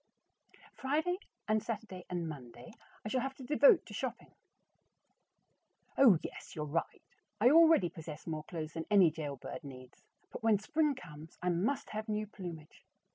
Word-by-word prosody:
Friday 315 +7 0 0.3
and 215 0 +2
Saturday 210 -5 -6
and 175 -2 -2
Monday 125 -5 -9 0.3
I - - -2
shall 255 +3 +1
have 270 +1 -3
to 265 - -11
devote 330 - +5
to 210 - -11
shopping. 250 +2 -5 1.6
Oh, 240 -10 +7
yes, - - -8
you're 150 - -3
right; 155 +3 -3 0.4
I 245 - +6
already 320 - +6
possess 155 -1 -9
more 155 -2 -4
clothes 160 -2 -5
than 165 0 -5
any 195 -6 +6
jailbird 150 +1 -6
needs, 130 -2 -11 0.3
but - - -7
when 220 -2 +4
spring 300 +7 +1
comes, 155 - -11
I 180 - +2
must 195 +11 0
have 215 +1 -4
new 215 0 -1
plumage. 175 -7 -9
200 Hz, 155 wpm, -33 LUFS, 160-255 Hz, 1.6 s, Oh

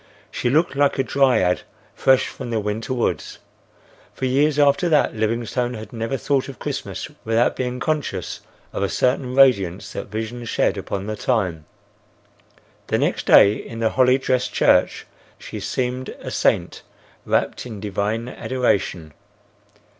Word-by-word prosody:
She 120 - -1
looked 155 +2 +2
like 145 0 +2
a 135 - +2
dryad 125 -10 +2 0.3
fresh 130 -1 +3
from - - -7
the 115 -1 0
winter 105 +4 -3
woods. 125 -2 -2 0.8
For 130 - -3
years 145 +3 +2
after 145 +4 +3
that 150 -3 +3
Livingstone 115 +3 -1
had 110 +2 -9
never 115 +3 -2
thought 140 0 0
of 135 - -9
Christmas - - -5 0.2
without 115 +2 +2
being 125 0 -3
conscious 150 - -2 0.3
of - - -3
a 100 - +1
certain 125 0 0
radiance 100 -10 +3
that - - -5
vision 110 +3 -5
shed - - +1
upon 100 0 -4
the 110 0 -3
time. 95 -10 -1 1.2
The - - +1
next - - -1
day 100 - +7
in 115 - -8
the 115 -1 +1
holly 130 0 +4
dressed 130 -1 0
church - - +2 0.3
she - - -8
seemed 125 0 -2
a - - -7
saint - - 0 0.5
wrapt - - 0
in 110 -4 -7
divine 105 +3 -2
adoration. 100 -12 -1
120 Hz, 145 wpm, -22 LUFS, 110-130 Hz, 1.2 s, day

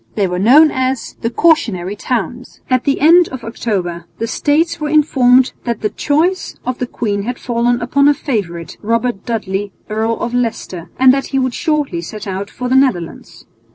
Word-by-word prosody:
They 205 - +1
were 180 -1 -2
known 285 +10 +6
as 260 -1 -2
"the 230 - 0
cautionary 225 - +1
towns." 245 +2 -4
At 255 -1 +2
the 275 - 0
end 340 +3 +6
of 260 -2 -8
October 180 -7 -3
the 230 - -2
States 325 +8 0
were 300 -1 -2
informed 260 -4 +4
that 235 -3 -3
the 210 - -1
choice 335 +6 0
of 255 0 -3
the 250 - -2
queen 205 -4 -2
had 240 +4 -4
fallen 240 0 0
upon 280 +4 +2
her 290 - +4
favourite, 175 - -4
Robert 230 0 -1
Dudley, 205 -3 -3 0.2
Earl 220 +2 0
of 240 0 -3
Leicester, 220 -8 -3
and 260 0 +6
that 275 0 -1
he 270 - -2
would 255 -2 0
shortly 295 - -1
set 210 +5 -8
out 195 +1 -4
for 250 - -5
the 255 - +1
Netherlands. 250 -12 -1
245 Hz, 185 wpm, -16 LUFS, 205-275 Hz, 0.2 s, known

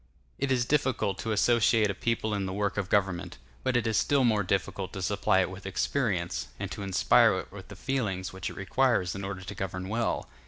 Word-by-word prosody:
It 140 0 0
is 125 -2 +2
difficult 130 -9 0
to 110 - -2
associate 110 -1 +3
a - - -4
people 110 +1 -1
in 100 -2 -1
the 95 - -4
work 100 0 -1
of 100 -2 -2
government; 95 -3 0 0.3
but 130 -1 +2
it 120 - 0
is 110 -2 +1
still 140 -2 +3
more 110 -4 +3
difficult 95 0 -2
to 95 - -5
supply 95 0 +2
it 95 - 0
with 95 0 -8
experience, 95 -3 -1
and - - -4
to - - -5
inspire 95 -1 +4
it - - -6
with - - -10
the - - -10
feelings 100 -10 -2
which 95 -1 -4
it - - -10
requires 100 -2 +1
in 95 - -6
order 95 -1 -5
to 95 +2 -7
govern 95 -1 -4
well. 115 +2 -1
100 Hz, 220 wpm, -28 LUFS, 95-115 Hz, 0.3 s, inspire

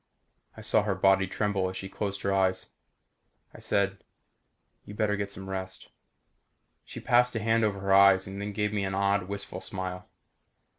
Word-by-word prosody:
I - - -8
saw - - +2
her 105 -2 -1
body 95 0 +3
tremble 95 -1 -1
as 95 - -7
she 95 - -6
closed 100 0 -4
her 100 - +1
eyes. 95 -1 0 0.8
I - - -12
said, 100 -1 0 0.8
"You 105 - -10
better 105 -1 +1
get 100 0 -3
some 95 -1 -9
rest." 95 -1 -6 0.9
She - - -9
passed 125 0 +3
a - - 0
hand 115 +1 +2
over 105 -2 0
her 95 0 +1
eyes 95 -1 +6
and 95 +1 -7
then 105 0 -4
gave 105 0 -1
me 100 -2 -1
an 95 0 -2
odd 100 -1 +1
wistful 100 0 -6
smile. 95 -1 -5
100 Hz, 180 wpm, -28 LUFS, 95-105 Hz, 0.9 s, eyes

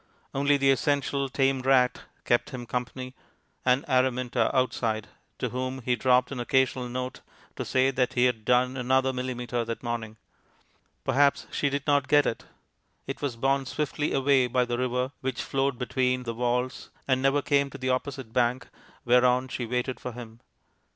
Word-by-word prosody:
Only 140 +1 +3
the 135 0 +4
essential 140 +1 0
tame 135 0 +1
rat 130 -1 +3 0.2
kept 120 - +2
him 125 -2 -7
company, 125 +2 -4 0.5
and 125 +2 +2
Araminta 130 -3 +1
outside, 115 -4 0 0.3
to - - -2
whom 130 0 -4
he 125 +1 +1
dropped 125 +2 +3
an 135 - -4
occasional 130 0 +1
note 125 +1 -4 0.3
to - - -3
say 130 +1 +2
that 130 0 0
he 125 0 +3
had 125 -3 0
done 125 +2 +2
another 130 +1 +2
millimetre 125 -1 -3
that 115 +1 -5
morning. 115 -2 -4 0.9
Perhaps 140 0 +2
she 145 - 0
did 140 0 -3
not 145 -2 +2
get 145 -1 +5
it; 115 - -3 0.6
it - - -6
was 140 -5 -2
borne 135 +2 0
swiftly 150 +1 -2
away 135 -1 +3
by 125 +1 +1
the 120 0 -2
river 125 +1 -1
which 130 -1 -2
flowed 135 -1 0
beneath 125 0 0
the 115 - -3
walls, 125 +2 -2 0.2
and 130 -1 +2
never 135 +1 +2
came 140 -1 +2
to 135 - -9
the 130 -1 -1
opposite 130 -2 -3
bank, 125 +1 +1 0.4
whereon 125 +1 +4
she 120 -2 -4
waited 125 +2 -2
for 125 - -6
him. 115 -1 -10
130 Hz, 170 wpm, -27 LUFS, 125-135 Hz, 0.9 s, get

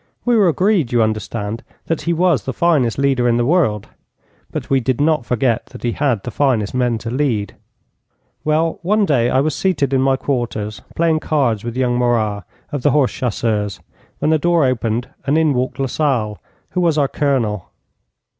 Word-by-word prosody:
We 245 -1 +3
were 205 -4 +4
agreed, 180 - +2
you 120 -2 +3
understand, 110 0 -3 0.2
that 165 - -2
he 170 - -1
was 170 -6 +2
the 130 - -3
finest 150 -9 +2
leader 135 -3 +2
in 120 - +2
the 120 - +1
world, 130 - +1 0.6
but - - -4
we 135 - +2
did 130 0 -1
not 150 -4 +1
forget 120 -1 0
that - - -12
he 120 - 0
had 125 -6 0
the 125 - -5
finest 125 -8 +1
men 125 -2 +1
to 115 - -3
lead. 120 -7 -1 0.9
Well, 160 +2 +1
one 205 +4 +2
day 125 -8 +2
I 130 - +3
was 155 +1 0
seated 145 -8 0
in 130 - +3
my 135 0 +3
quarters 115 -6 -3
playing 165 -1 +2
cards 130 -10 0
with 120 +1 -5
young 125 -1 +1
Morat, 110 -4 0 0.3
of 145 - -3
the 145 - +3
horse 140 -2 +2
chasseurs, 105 - -2 0.4
when 155 - 0
the 160 - +3
door 170 -1 +3
opened 120 -1 -1 0.2
and 145 +3 +3
in 160 -2 +3
walked 125 0 -2
Lasalle, 130 -6 -1 0.3
who 180 - 0
was 165 -3 +2
our 145 -2 +3
Colonel. 125 - -1
130 Hz, 185 wpm, -18 LUFS, 115-155 Hz, 0.9 s, were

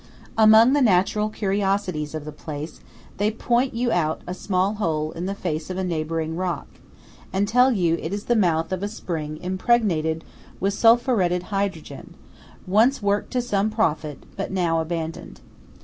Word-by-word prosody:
Among 220 +3 +7
the 290 - +3
natural 210 -1 +3
curiosities 195 -7 -1
of 155 -2 -5
the 155 - -6
place, 150 +1 -7 0.4
they 205 +1 +2
point 240 +3 0
you 240 0 0
out 160 -4 0
a 180 - -4
small 185 +1 0
hole 155 -4 0
in 170 +3 -5
the 195 - -3
face 160 -4 -4
of 185 - -4
a 190 - -1
neighbouring 160 -2 -2
rock, 175 -3 -2 0.7
and 195 +2 0
tell 250 +4 +4
you 175 -8 +2
it 160 - -4
is 205 +1 -3
the 240 - +1
mouth 170 -5 +1
of 185 -1 -2
a 200 - -1
spring 160 -7 -5
impregnated 180 -5 +1 0.4
with 195 +1 0
sulphuretted 225 -6 +3
hydrogen, 185 -8 -4 0.5
once 220 +6 +3
worked 200 0 0
to 250 -1 +1
some 210 -3 0
profit, 155 - -1
but 195 - -3
now 175 -4 +1
abandoned. 160 0 -5
185 Hz, 165 wpm, -23 LUFS, 160-215 Hz, 0.7 s, Among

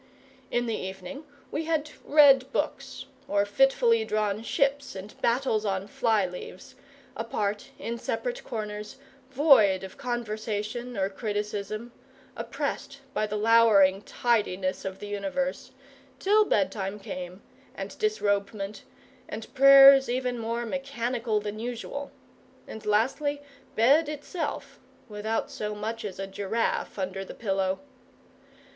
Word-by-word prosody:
In 240 0 0
the 225 -2 -1
evening 190 - -7 0.3
we 315 +2 -2
had 310 -2 -1
read 275 -3 +6
books, - - -3 0.2
or 200 0 +2
fitfully 230 0 +3
drawn 215 -1 -1
ships 280 - 0
and 195 +2 -8
battles 235 -3 +1
on 195 -2 -1
fly 225 -5 +1
leaves, 180 0 -9 0.4
apart, 215 +1 -2
in 235 +1 -4
separate - - -3
corners, 210 -1 -5 0.3
void 260 -9 +5
of 190 - -10
conversation 230 -1 -3
or 190 -1 +1
criticism, 210 +2 -4 0.4
oppressed 275 0 -4
by 215 - 0
the 210 - -4
lowering 210 -3 +5
tidiness 195 -6 0
of 190 0 -4
the 205 - -8
universe, 205 +8 -3 0.5
till 420 +8 +4
bedtime 195 - 0
came, 185 -1 -7 0.3
and - - -6
disrobement, 205 - -1 0.5
and 220 +1 -7
prayers 275 0 +9
even 250 -1 -1
more 230 +1 -2
mechanical 240 -3 -2
than 210 0 -5
usual, 245 +4 -5 0.6
and 220 -1 -9
lastly 270 +7 +1 0.4
bed 285 +8 +4
itself 305 +2 -5 0.3
without 215 +1 -3
so 210 0 -4
much 225 +2 -4
as 200 -3 -5
a 195 - -3
giraffe 200 +5 -2
under 190 0 -3
the - - -10
pillow. 195 -3 0
220 Hz, 120 wpm, -27 LUFS, 205-265 Hz, 0.6 s, prayers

